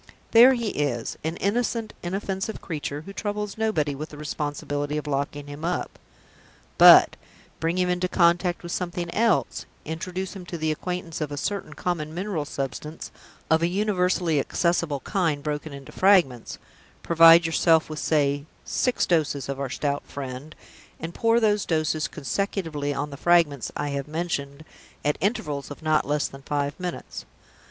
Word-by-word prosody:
There 240 +3 +8
he 235 -3 -2
is, 135 - -2
an 160 +2 -2
innocent, 225 +2 -1
inoffensive 195 +3 -3
creature, 150 -3 -4
who 195 +5 -10
troubles 205 0 -3
nobody 215 -10 0
with 150 +3 -6
the 150 - -11
responsibility 145 0 -3
of 150 - -4
locking 145 0 -2
him 145 +2 -9
up! 175 +1 -3 0.8
But - - +9 0.4
bring 165 +2 0
him 180 0 +2
into 180 0 0
contact 175 0 +2
with 175 - -6
something 175 -1 -3
else 230 0 +1 0.2
introduce 180 +5 -4
him 190 - -7
to 170 - -5
the 155 -1 0
acquaintance 175 0 -4
of 150 -1 -2
a 145 - -4
certain 195 -1 -3
common 155 -2 -3
mineral 180 -5 -2
substance, 145 +3 -5 0.4
of 160 0 +4
a 170 - +3
universally 180 -4 +1
accessible 170 -1 0
kind, 165 -8 -1
broken 150 0 -3
into 140 -1 -10
fragments; 175 - +3 0.5
provide 165 0 +7
yourself 165 0 +3
with 155 -1 -6
(say) 145 -2 +1 0.2
six 250 - +1
doses 150 -5 0
of 140 0 -4
our 140 -1 -2
Stout 145 +2 -1
Friend, 135 +2 -7 0.4
and 165 +1 -6
pour 230 +4 +3
those 210 -2 +2
doses 155 -1 0
consecutively 155 - -2
on 145 +1 -3
the 140 - -7
fragments 165 -6 +2
I 145 - -2
have 140 0 -3
mentioned, 155 -2 -4 0.4
at 150 - +1
intervals 150 - -1
of 145 +2 -10
not 155 -2 +2
less 145 0 +1
than 135 - -12
five 145 0 -2
minutes. 180 -1 -6
160 Hz, 160 wpm, -25 LUFS, 145-180 Hz, 0.8 s, But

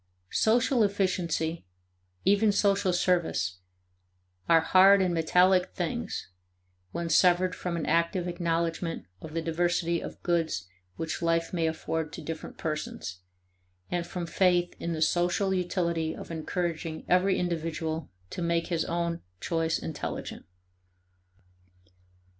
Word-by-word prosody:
Social 240 +2 +3
efficiency, 175 - 0 0.6
even 205 +2 +4
social 200 -2 +2
service, 175 - +1 0.9
are 165 -1 +7
hard 190 +4 +6
and 185 -2 +2
metallic 180 +3 +3
things 195 - -3 0.6
when 170 0 -3
severed 180 +2 +4
from 175 -2 -3
an 165 - -2
active 170 +3 +1
acknowledgment 170 -1 -1 0.2
of 160 0 -9
the 165 - -1
diversity 170 0 0
of - - -8
goods 165 - 0 0.3
which 165 -1 -4
life 165 0 +1
may 165 -2 +1
afford 160 -1 -2
to - - -6
different 160 +1 -6
persons, 150 - -4 0.7
and 175 -1 -1
from 175 0 -4
faith 175 0 +2
in 170 - -2
the 160 0 +1
social 175 +4 +1
utility 170 -3 -1
of - - -9
encouraging 165 0 -3
every 185 +1 +3
individual 165 -2 -2 0.2
to - - -5
make 170 0 0
his 165 -2 +1
own 170 0 -2 0.2
choice 165 - 0
intelligent. 155 - -5
170 Hz, 120 wpm, -28 LUFS, 165-180 Hz, 0.9 s, are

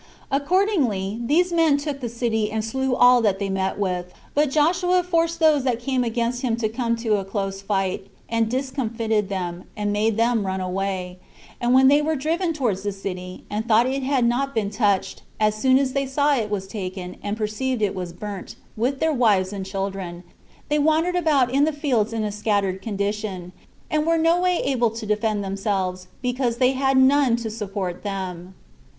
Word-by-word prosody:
Accordingly, 275 - +1
these 345 +8 +2
men 325 -4 +4
took 285 -1 -4
the 245 -3 -4
city, 225 -2 -1
and 220 0 -2
slew 265 +3 -1
all 245 0 +6
that 205 -4 +2
they 200 0 -3
met 190 0 -1
with; 180 -3 -2 0.2
but 295 0 +2
Joshua 355 +5 +2
forced 335 -1 0
those 310 -4 +4
that 250 -3 0
came 255 +1 0
against 235 +1 -1
him 240 -4 0
to 225 -2 -1
come 235 0 -1
to 225 -2 0
a 195 - -2
close 195 0 -3
fight, 195 -1 -1 0.2
and 230 -1 0
discomfited 230 -5 -1
them, 180 -2 -4
and 205 -1 -1
made 215 +1 +1
them 230 -1 +2
run 190 0 -2
away; 185 -1 -3 0.4
and 240 +1 +3
when 265 0 +7
they 290 +2 +5
were 315 +1 0
driven 330 +5 0
towards 240 - -1
the 205 +1 -2
city, 185 -2 -6
and 215 +2 -3
thought 230 +1 +5
it 270 +2 -1
had 260 -2 +1
not 270 +3 0
been 205 -3 0
touched, 205 -3 0 0.2
as 215 -1 +3
soon 260 +5 +3
as 270 -1 0
they 275 -1 0
saw 285 +2 +2
it 220 -5 -1
was 200 -2 -2
taken, 185 -2 -6
and 205 +1 -3
perceived 220 +3 -2
it 200 - +1
was 180 -2 -5
burnt, 195 +2 -7 0.2
with 255 +5 -1
their 320 -1 +2
wives 205 -7 +2
and 195 -1 -5
children, 190 -3 -4 0.4
they 300 0 +1
wandered 315 +4 +2
about 290 -8 +2
in 280 +1 +4
the 315 - +1
fields 255 -8 0
in 225 -1 -2
a 210 - -2
scattered 200 -3 0
condition, 200 -3 -3 0.4
and 305 +1 +1
were 330 0 +3
no 330 +2 +3
way 360 -1 +2
able 245 -4 +2
to 225 0 -7
defend 210 0 0
themselves, 190 -2 -2 0.2
because 245 -1 0
they 255 +1 +4
had 270 0 +1
none 265 -2 +5
to 230 -2 -4
support 200 -4 -4
them. 190 -2 -5
225 Hz, 195 wpm, -23 LUFS, 195-270 Hz, 0.4 s, when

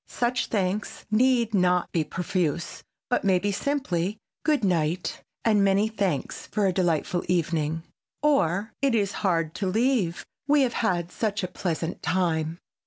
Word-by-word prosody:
Such 245 +1 0
thanks 200 -1 -2
need 235 0 +3
not 180 -2 +2
be 165 - +1
profuse, 175 -1 -2 0.3
but 245 - +1
may 190 -2 +4
be 205 +3 0
simply—"Good 225 - -1
night, 175 -2 0 0.2
and 210 -3 +4
many 200 +2 +3
thanks 195 -9 -2
for 210 -2 0
a 190 - +2
delightful 175 -1 0
evening!" 165 -2 0 0.4
or 220 - +2
"It 275 -4 +3
is 205 -3 +1
hard 165 -5 +1
to 195 - -2
leave, 220 -4 +1 0.2
we 295 0 +5
have 245 -3 0
had 175 -6 0
such 205 -3 -1
a - - 0
pleasant 170 -2 -3
time!" 165 -3 0
190 Hz, 145 wpm, -26 LUFS, 170-220 Hz, 0.4 s, we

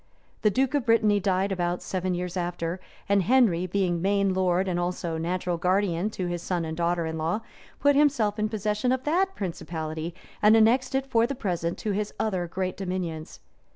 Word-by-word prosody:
The 215 - +4
duke 260 +5 +1
of 280 -5 0
Brittany 215 -3 +4
died 195 0 0
about 175 -1 -1
seven 185 -1 -2
years 180 0 -4
after; 175 0 -2 0.3
and 200 0 +3
Henry, 195 -6 +3
being 180 -2 0
mesne 200 0 +2
lord 185 0 +1
and 175 -1 0
also 175 -2 -2
natural 175 +1 -1
guardian 185 +1 +1
to 185 - -1
his 175 -1 -3
son 175 -1 -2
and 160 0 -4
daughter 170 0 0
in 160 0 -4
law, 165 +8 -1 0.4
put 285 0 +4
himself 255 -8 +2
in 215 0 +1
possession 215 +3 0
of 260 0 0
that 375 +6 +1
principality, 165 -3 -4 0.3
and 215 +1 +6
annexed 250 +4 +3
it 270 0 +1
for 235 -3 +2
the 275 - -3
present 175 -8 -2
to 215 - -2
his 205 +1 -2
other 185 -5 -1
great 185 +2 -3
dominions. 180 -4 -4
185 Hz, 190 wpm, -26 LUFS, 175-215 Hz, 0.4 s, and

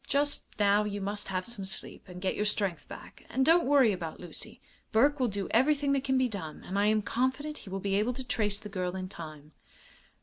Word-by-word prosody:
"Just 285 +1 +1
now 205 0 +4
you 205 -1 -3
must 205 +1 -3
have 185 -1 -2
some 235 -4 -4
sleep 190 - -5
and 180 +1 -9
get 190 - +1
your 210 - 0
strength 205 -4 0
back. - - -11
And 265 0 +1
don't 335 -1 +5
worry 270 -5 +6
about 170 -4 -5
Lucy. 175 - -7 0.3
Burke 280 +6 +4
will 255 - +3
do 200 -2 -3
everything 280 +4 +3
that 275 -1 +1
can 265 -2 +2
be 260 -1 +3
done, 185 -9 -6
and 195 +2 -2
I 205 - +4
am 215 0 +3
confident 260 +7 -1
he - - -11
will 195 +1 -3
be 195 0 -1
able 210 +5 +2
to 260 - -6
trace 210 -5 0
the 210 - -8
girl 185 -3 -3
in 185 0 -4
time." 155 -4 -9
210 Hz, 230 wpm, -30 LUFS, 190-260 Hz, 0.3 s, worry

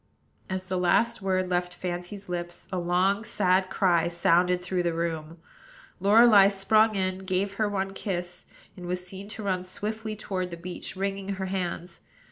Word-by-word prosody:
As 190 0 -3
the 185 -1 -1
last 225 +6 +2
word 185 -1 0
left 180 0 -1
Fancy's 180 +3 -5
lips, 175 -1 -5
a 185 - -1
long, 185 +4 +1
sad 185 -3 +2
cry 175 -4 +2
sounded 175 +1 +2
through 180 0 -1
the 170 -1 -1
room; 165 -1 -3 0.6
Lorelei 205 +1 +7
sprung 215 +2 +3
in, 185 -1 -1
gave 190 +1 -1
her 215 - +2
one 195 -1 -2
kiss, 180 -3 -4 0.3
and 180 -2 -8
was 180 0 -2
seen 190 +2 -7
to 215 0 -6
run 185 -2 -1
swiftly 215 +4 -4
toward 185 -3 -3
the 170 - -7
beach, 180 +2 -6
wringing 195 +1 -2
her 190 0 -3
hands. 180 -2 -4
185 Hz, 165 wpm, -27 LUFS, 180-195 Hz, 0.6 s, Lorelei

